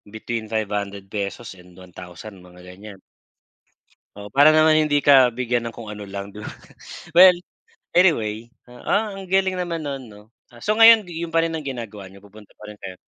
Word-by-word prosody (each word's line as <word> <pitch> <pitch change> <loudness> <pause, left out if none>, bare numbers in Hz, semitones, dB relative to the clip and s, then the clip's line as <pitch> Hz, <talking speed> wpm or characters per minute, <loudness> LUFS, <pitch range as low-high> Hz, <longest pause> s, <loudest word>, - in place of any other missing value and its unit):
between 110 0 -5
₱500 100 0 -5
and 90 0 -18
1000 90 +2 -12
mga 90 0 -17
ganiyan. 95 +2 -12 1.2
O 105 0 -10
para 145 +6 +5
naman 155 0 +4
hindi 150 -2 +1
ka 130 -4 +5
bigyan 120 -1 -2
ng 115 - -7
kung 110 -2 -9
ano 105 -1 -9
lang 100 0 -7
'di 105 - -13
ba. - - -6 0.6
Well 180 +2 +7 0.6
anyway 115 - +1 0.2
ah, 200 - -2
ang 195 - -9
galing 190 0 0
naman 170 -2 -4
nun 140 -3 -6
'no, 105 -2 -15 0.3
ah, 120 - -16
so 215 +1 -1
ngayon 225 -4 +7
yun 165 0 -6
pa 165 - +3
rin 165 0 -2
ang 155 - -9
ginagawa 115 -7 -7
niyo 95 +1 -15
pupunta 105 +1 -17
pa 105 - -10
rin 105 - -12
kayo? 95 -2 -9
115 Hz, 180 wpm, -21 LUFS, 100-155 Hz, 1.2 s, Well